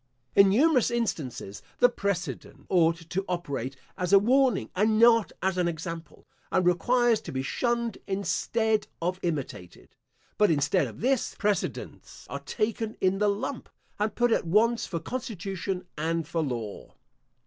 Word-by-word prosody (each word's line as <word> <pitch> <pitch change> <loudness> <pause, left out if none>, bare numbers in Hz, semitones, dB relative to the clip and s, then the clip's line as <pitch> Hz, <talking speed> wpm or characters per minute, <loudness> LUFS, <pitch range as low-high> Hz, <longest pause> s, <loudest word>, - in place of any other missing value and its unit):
In 200 -1 +7
numerous 260 +4 +4
instances, 155 - -3 0.2
the 245 - +6
precedent 200 -6 -4
ought 165 -2 +2
to 195 +2 -1
operate 140 -7 -3 0.2
as 180 0 -1
a 200 - +9
warning, 250 +2 +2
and 215 +3 +2
not 230 -1 +5
as 190 -1 +1
an 175 - +2
example, 165 -1 -6 0.3
and 180 - +2
requires 235 +6 +3
to - - -8
be 130 0 -2
shunned 235 - -1
instead 215 +2 0
of 180 +2 -2
imitated; 140 - -5 0.4
but 210 -1 +5
instead 150 +1 +2
of 115 - -11
this, 260 +2 +1
precedents 205 -4 -3
are - - -3
taken 220 0 -2
in 190 +1 +1
the 210 0 +3
lump, 240 +6 -3 0.3
and 210 0 -1
put 240 0 +2
at 195 - +1
once 225 +6 +2
for 170 - -3
constitution 195 -5 -4
and 165 0 -1
for 165 0 -1
law. 120 -8 -5
195 Hz, 150 wpm, -27 LUFS, 165-230 Hz, 0.4 s, a